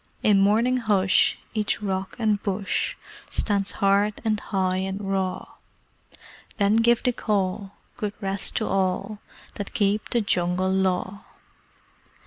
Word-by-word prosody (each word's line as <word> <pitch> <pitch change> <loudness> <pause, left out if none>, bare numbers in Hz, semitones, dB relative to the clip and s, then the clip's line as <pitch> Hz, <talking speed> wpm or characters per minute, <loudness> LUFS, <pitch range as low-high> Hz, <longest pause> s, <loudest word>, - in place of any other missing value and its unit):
In 205 -2 +5
morning 230 +6 +3
hush, 205 -5 +3 0.2
each 215 -2 -1
rock 190 -2 -3
and 215 -3 +1
bush 200 -1 -1 0.3
Stands 200 -2 0
hard, 200 +1 +2
and 215 -1 +1
high, 185 -3 -1
and 190 +1 -3
raw: 190 -2 -3 1.0
Then 205 +1 +3
give 235 +1 +3
the 250 - +2
Call: 195 -2 -2 0.2
"Good 210 -4 -3
rest 195 -1 0
to 220 - 0
all 195 +2 -1 0.4
That 205 - -6
keep 205 0 +1
The 240 - +1
Jungle 185 -1 0
Law!" 190 +1 -1
200 Hz, 125 wpm, -24 LUFS, 190-215 Hz, 1.0 s, In